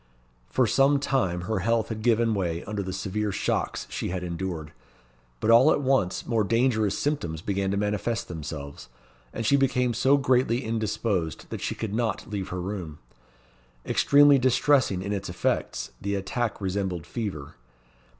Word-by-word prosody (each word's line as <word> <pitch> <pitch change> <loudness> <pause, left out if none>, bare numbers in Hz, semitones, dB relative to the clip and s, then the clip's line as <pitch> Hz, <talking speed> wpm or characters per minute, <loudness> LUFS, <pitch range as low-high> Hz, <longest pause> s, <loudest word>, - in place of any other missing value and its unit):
For 130 - +2
some 135 +5 +3
time 105 -11 0
her 105 +3 -2
health 115 +3 +1
had 110 -1 -4
given 115 0 +2
way 85 -4 -2
under 105 -1 -3
the 95 -1 -4
severe 105 +2 -2
shocks - - -1
she - - -3
had 90 0 -3
endured; 85 -3 -4 0.7
but 110 - +2
all 125 +6 +7
at - - +2
once 130 -9 +1
more 115 -3 +1
dangerous 110 -1 +1
symptoms 85 - -2
began 100 -1 -1
to 100 - 0
manifest 105 +3 -1
themselves, 75 -4 -7 0.4
and 115 - -4
she 140 - +4
became 125 -2 +1
so 130 +5 +4
greatly 130 -2 +2
indisposed 110 - -2
that - - -5
she - - -2
could 110 -3 -4
not 110 -2 -1
leave 100 -3 -4
her 90 0 -4
room. 90 -5 -5 0.9
Extremely 145 -1 +5
distressing 130 -6 +2
in 100 - -2
its 100 -2 -4
effects, 90 0 -2
the 100 0 -1
attack 115 +4 -2
resembled 95 -3 -2
fever. 85 - -5
105 Hz, 160 wpm, -26 LUFS, 95-120 Hz, 0.9 s, all